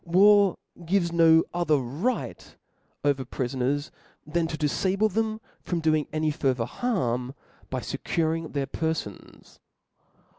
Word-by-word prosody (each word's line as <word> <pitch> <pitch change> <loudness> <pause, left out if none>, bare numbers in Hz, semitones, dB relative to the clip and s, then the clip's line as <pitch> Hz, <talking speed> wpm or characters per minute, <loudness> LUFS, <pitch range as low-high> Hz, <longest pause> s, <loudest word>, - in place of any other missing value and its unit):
War 200 +2 +5 0.3
gives 170 0 +1
no 165 -1 +6
other 170 -3 +2
right 145 - -3 0.5
over 140 -2 +2
prifoners 130 +3 -2 0.3
than 165 +2 0
to 155 - -4
difable 190 +7 +1
them 220 0 0 0.2
from 175 - -2
doing 155 -2 +1
any 155 0 0
farther 130 -6 0
harm, 125 - -2 0.3
by - - -3
fecuring 165 0 -2
their 140 -1 0
perfons. 160 -10 -5
160 Hz, 115 wpm, -26 LUFS, 140-180 Hz, 0.5 s, no